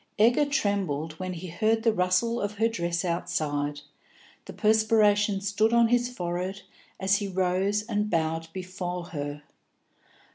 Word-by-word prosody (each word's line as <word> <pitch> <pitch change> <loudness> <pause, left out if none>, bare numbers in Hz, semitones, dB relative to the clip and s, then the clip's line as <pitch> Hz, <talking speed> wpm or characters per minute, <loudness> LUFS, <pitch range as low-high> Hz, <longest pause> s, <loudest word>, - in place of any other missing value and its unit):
Egger 240 +7 +4
trembled 200 - -1
when 185 0 -3
he 175 +1 -7
heard 220 +6 +1
the 225 -2 +3
rustle 200 +5 +1
of 205 +1 -2
her 220 +2 +2
dress 175 -5 -2
outside, 150 -4 -2 0.6
the - - -8
perspiration 210 -2 +3
stood 210 +3 +1
on 235 -1 +5
his 245 0 +2
forehead 185 -2 -4 0.4
as 195 +1 +3
he 205 - -3
rose 190 +2 0
and 210 -2 -1
bowed 165 -1 -1
before 180 -1 -5
her. 145 -1 -5
195 Hz, 140 wpm, -27 LUFS, 175-220 Hz, 0.6 s, on